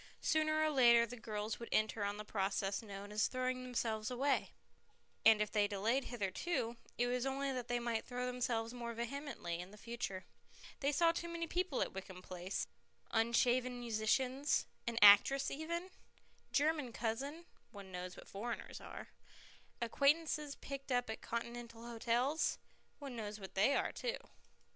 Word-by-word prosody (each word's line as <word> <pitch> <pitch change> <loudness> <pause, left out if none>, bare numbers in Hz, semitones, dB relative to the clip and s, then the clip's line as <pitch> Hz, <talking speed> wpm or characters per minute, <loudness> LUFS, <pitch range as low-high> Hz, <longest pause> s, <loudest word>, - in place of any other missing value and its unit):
Sooner 310 -1 +2
or 310 0 +3
later 235 -4 +7
the 240 +2 -8
girls 215 -2 -4
would 235 - -7
enter 215 -1 +2
on 200 0 -1
the 210 - -6
process 195 0 0
known 200 -2 -8
as 210 +1 +2
throwing 255 0 -1
themselves 230 -4 -1
away, 270 +3 +1 0.7
and 220 -1 +8
if 210 - -6
they 210 - +3
had 205 - +2
delayed 225 +7 +1
hitherto, 230 - -2 0.2
it 245 - +3
was 245 0 0
only 270 +1 -1
that 250 -2 -3
they 245 - +1
might 235 -2 -1
throw 250 0 -3
themselves 240 -2 -1
more 235 -1 -5
vehemently 235 - -4
in 180 +1 -6
the 210 - -13
future. 220 -5 -4 0.5
They 280 +1 +2
saw 330 +3 +4
too 340 +1 -4
many 335 0 -2
people 355 -3 0
at - - -6
Wickham 190 -1 -8
Place 185 +1 -3 0.5
unshaven 245 +2 +2
musicians, 250 +5 +1 0.2
an 235 -1 -1
actress 210 +7 +8
even, 340 +5 -3 0.6
German 295 -4 +1
cousins 275 +10 -3 0.2
(one 200 -2 -10
knows 180 0 -5
what - - -11
foreigners 230 +4 -5
are), - - -8 0.7
acquaintances 295 +4 +2
picked 275 -1 -7
up 245 -2 +1
at 220 - -6
Continental 235 0 -5
hotels 240 +6 +1 0.4
(one 275 -4 -7
knows 210 -2 -5
what 190 -2 -8
they 215 +9 +4
are - - +1
too). - - -2
235 Hz, 160 wpm, -37 LUFS, 215-275 Hz, 0.7 s, and